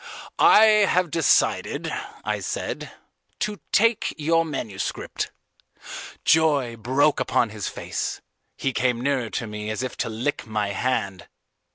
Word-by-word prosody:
"I 220 Hz, -, +8 dB
have 200 Hz, -6 st, +4 dB
decided," 165 Hz, -, +2 dB, 0.3 s
I -, -, -1 dB
said, -, -, -4 dB, 0.5 s
"to 210 Hz, -1 st, -3 dB
take 230 Hz, +1 st, +2 dB
your 165 Hz, +2 st, +2 dB
manuscript." 120 Hz, -11 st, -4 dB, 0.9 s
Joy 150 Hz, -7 st, +3 dB
broke 130 Hz, +6 st, +2 dB
upon 120 Hz, -, +1 dB
his 105 Hz, -2 st, -4 dB
face. -, -, -4 dB, 0.4 s
He 135 Hz, -, -1 dB
came 125 Hz, -2 st, +1 dB
nearer 130 Hz, -3 st, 0 dB
to 120 Hz, -, -3 dB
me 105 Hz, 0 st, -5 dB
as 110 Hz, +4 st, -2 dB
if 130 Hz, -, -4 dB
to -, -, -2 dB
lick 115 Hz, +4 st, -3 dB
my 105 Hz, -2 st, -1 dB
hand. 100 Hz, -3 st, -2 dB
130 Hz, 130 wpm, -24 LUFS, 110-160 Hz, 0.9 s, I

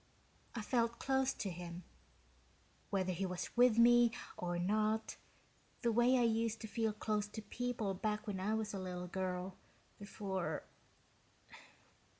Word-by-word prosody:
"I 225 Hz, -, -3 dB
felt 235 Hz, 0 st, +1 dB
close 265 Hz, 0 st, +2 dB
to 195 Hz, -, -3 dB
him, 175 Hz, 0 st, -7 dB, 1.1 s
whether 185 Hz, -2 st, 0 dB
he 190 Hz, +2 st, -1 dB
was 180 Hz, -1 st, -4 dB
with 245 Hz, -2 st, +6 dB
me 240 Hz, 0 st, +7 dB, 0.2 s
or 175 Hz, -1 st, -2 dB
not, 215 Hz, +4 st, +1 dB, 0.7 s
the 235 Hz, -, +3 dB
way 240 Hz, +3 st, +5 dB
I 245 Hz, -, +4 dB
used 225 Hz, -1 st, +1 dB
to 220 Hz, -, -5 dB
feel 225 Hz, +1 st, 0 dB
close 210 Hz, 0 st, -1 dB
to 210 Hz, -, -7 dB
people 235 Hz, -4 st, -2 dB
back 210 Hz, +2 st, -2 dB
when 200 Hz, -3 st, -3 dB
I 210 Hz, +4 st, 0 dB
was 220 Hz, -1 st, -2 dB
a 195 Hz, -, -3 dB
little 180 Hz, -1 st, -4 dB
girl, 185 Hz, 0 st, -3 dB, 0.4 s
before 195 Hz, -2 st, -3 dB
210 Hz, 145 wpm, -37 LUFS, 185-230 Hz, 1.1 s, me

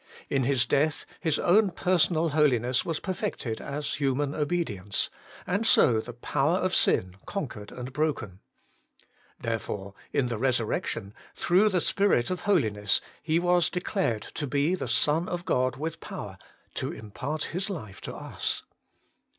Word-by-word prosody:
In 135 Hz, -2 st, +2 dB
His 135 Hz, -2 st, +3 dB
death 150 Hz, +2 st, +1 dB
His 160 Hz, -3 st, +1 dB
own 200 Hz, +3 st, +4 dB
personal 170 Hz, -2 st, +2 dB
holiness 130 Hz, -5 st, +3 dB
was 165 Hz, -2 st, -2 dB
perfected 185 Hz, -, -3 dB
as 145 Hz, +1 st, -3 dB
human 140 Hz, +1 st, 0 dB
obedience, 145 Hz, -, -1 dB, 0.3 s
and 200 Hz, +5 st, 0 dB
so 120 Hz, -, +5 dB
the 120 Hz, -, -8 dB
power 140 Hz, +7 st, +1 dB
of 185 Hz, 0 st, 0 dB
sin 90 Hz, 0 st, +2 dB
conquered 125 Hz, -, -5 dB
and 125 Hz, +1 st, -7 dB
broken. 130 Hz, -, -1 dB, 1.0 s
Therefore 105 Hz, -3 st, -3 dB, 0.2 s
in 130 Hz, -, +1 dB
the 115 Hz, -3 st, -3 dB
resurrection, 115 Hz, -5 st, 0 dB, 0.2 s
through 190 Hz, +5 st, +4 dB
the. 185 Hz, -3 st, +2 dB
Spirit 195 Hz, -10 st, +2 dB
of 180 Hz, -, -1 dB
Holiness, 105 Hz, -, +3 dB, 0.2 s
He 160 Hz, +1 st, +1 dB
was 175 Hz, -1 st, +3 dB
declared 180 Hz, -, -1 dB
to 145 Hz, -, -3 dB
be 145 Hz, +5 st, +2 dB
the 185 Hz, -, -2 dB
Son 160 Hz, +4 st, +2 dB
of 175 Hz, 0 st, -3 dB
God 130 Hz, -4 st, +1 dB
with 155 Hz, +4 st, -4 dB
power -, -, -7 dB, 0.3 s
to -, -, -2 dB
impart 135 Hz, +8 st, -4 dB
His 185 Hz, +4 st, -2 dB
life 110 Hz, -, -6 dB
to -, -, -6 dB
us. -, -, -2 dB
145 Hz, 145 wpm, -28 LUFS, 120-175 Hz, 1.0 s, so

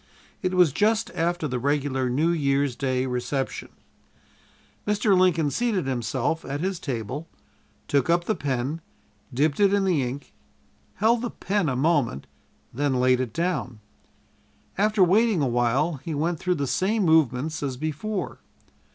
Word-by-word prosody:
It 185 Hz, 0 st, -1 dB
was 180 Hz, -5 st, +5 dB
just 215 Hz, -, +1 dB
after 170 Hz, -1 st, -1 dB
the 125 Hz, -2 st, -2 dB
regular 135 Hz, -1 st, 0 dB
New 150 Hz, +7 st, +2 dB
Year's 140 Hz, -4 st, +1 dB
Day 130 Hz, -1 st, -1 dB
reception. 130 Hz, +2 st, -3 dB, 1.2 s
Mr. 210 Hz, -1 st, +3 dB
Lincoln 170 Hz, -5 st, +3 dB
seated 225 Hz, -, 0 dB
himself 130 Hz, +4 st, -1 dB
at 140 Hz, +1 st, -4 dB
his 185 Hz, +1 st, -2 dB
table, 130 Hz, +4 st, -4 dB, 0.6 s
took 140 Hz, +2 st, +1 dB
up 170 Hz, +1 st, +3 dB
the 215 Hz, -, 0 dB
pen, 140 Hz, -, -2 dB, 0.5 s
dipped 145 Hz, +5 st, +1 dB
it 200 Hz, -1 st, +4 dB
in 200 Hz, -, +1 dB
the 175 Hz, -7 st, +2 dB
ink, 130 Hz, +3 st, -5 dB, 0.6 s
held 225 Hz, +3 st, +2 dB
the 240 Hz, -, -2 dB
pen 200 Hz, -7 st, -1 dB
a 130 Hz, -, -1 dB
moment, 135 Hz, -, +1 dB, 0.5 s
then 135 Hz, 0 st, 0 dB
laid 125 Hz, 0 st, +3 dB
it 130 Hz, -3 st, -2 dB
down. 145 Hz, -7 st, -2 dB, 1.0 s
After 210 Hz, 0 st, +3 dB
waiting 205 Hz, +2 st, +3 dB
a -, -, +2 dB
while 125 Hz, +6 st, +1 dB
he 165 Hz, -3 st, -4 dB
went 165 Hz, +2 st, -1 dB
through 180 Hz, -1 st, 0 dB
the 140 Hz, -3 st, -1 dB
same 200 Hz, -, 0 dB
movements 155 Hz, -1 st, +2 dB
as 135 Hz, -3 st, -3 dB
before. 165 Hz, +7 st, -4 dB
150 Hz, 150 wpm, -25 LUFS, 130-185 Hz, 1.2 s, was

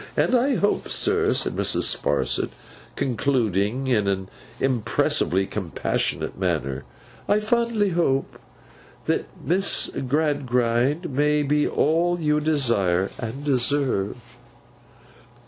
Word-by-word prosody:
And -, -, +2 dB
I 260 Hz, +2 st, +3 dB
hope, 205 Hz, -2 st, 0 dB
sir,' 420 Hz, +1 st, +2 dB
said -, -, 0 dB
Mrs. -, -, +1 dB
Sparsit, -, -, 0 dB, 0.5 s
concluding 120 Hz, -2 st, 0 dB
in 110 Hz, -6 st, +1 dB
an 95 Hz, -1 st, -2 dB, 0.3 s
impressively 110 Hz, -6 st, +1 dB
compassionate 95 Hz, -4 st, -3 dB
manner, 65 Hz, +1 st, -2 dB, 0.4 s
'I 205 Hz, -, +4 dB
fondly 225 Hz, -1 st, +1 dB
hope 165 Hz, -6 st, 0 dB, 0.7 s
that -, -, 0 dB, 0.2 s
Miss 190 Hz, +4 st, +2 dB, 0.2 s
Gradgrind 135 Hz, 0 st, 0 dB
may 150 Hz, +2 st, +2 dB
be 150 Hz, +1 st, +1 dB
all 170 Hz, +3 st, +1 dB
you 150 Hz, -2 st, +1 dB
desire, 115 Hz, -, +1 dB
and 115 Hz, +5 st, -5 dB
deserve! 130 Hz, -6 st, +1 dB
140 Hz, 100 wpm, -23 LUFS, 115-165 Hz, 0.7 s, I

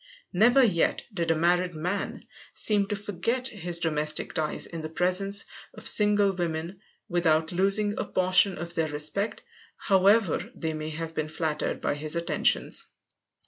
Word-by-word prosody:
Never 240 Hz, +8 st, +5 dB
yet 180 Hz, -8 st, +1 dB
did 170 Hz, -4 st, -2 dB
a 165 Hz, -, +3 dB
married 175 Hz, +2 st, +1 dB
man 180 Hz, +6 st, -4 dB, 0.3 s
seem 205 Hz, -2 st, +2 dB
to 205 Hz, -, -2 dB
forget 210 Hz, +6 st, -3 dB
his 175 Hz, -4 st, -2 dB
domestic 155 Hz, -2 st, -1 dB
ties 155 Hz, -1 st, -2 dB
in 165 Hz, -1 st, -7 dB
the 155 Hz, -, -6 dB
presence 185 Hz, +4 st, +1 dB, 0.3 s
of 215 Hz, -, -2 dB
single 205 Hz, -1 st, +5 dB
women 170 Hz, +1 st, -4 dB, 0.3 s
without 160 Hz, -2 st, +1 dB
losing 195 Hz, +3 st, +1 dB
a -, -, -1 dB
portion 185 Hz, +1 st, +3 dB
of 170 Hz, +2 st, -6 dB
their 165 Hz, -2 st, 0 dB
respect, 155 Hz, +9 st, -2 dB, 0.3 s
however 195 Hz, -1 st, +2 dB
they 160 Hz, -1 st, -3 dB
may 155 Hz, 0 st, -5 dB
have 160 Hz, +1 st, -6 dB
been 155 Hz, -1 st, -2 dB
flattered 155 Hz, -1 st, -3 dB
by -, -, 0 dB
his 150 Hz, +2 st, -1 dB
attentions. 170 Hz, 0 st, 0 dB
175 Hz, 150 wpm, -27 LUFS, 160-200 Hz, 0.3 s, Never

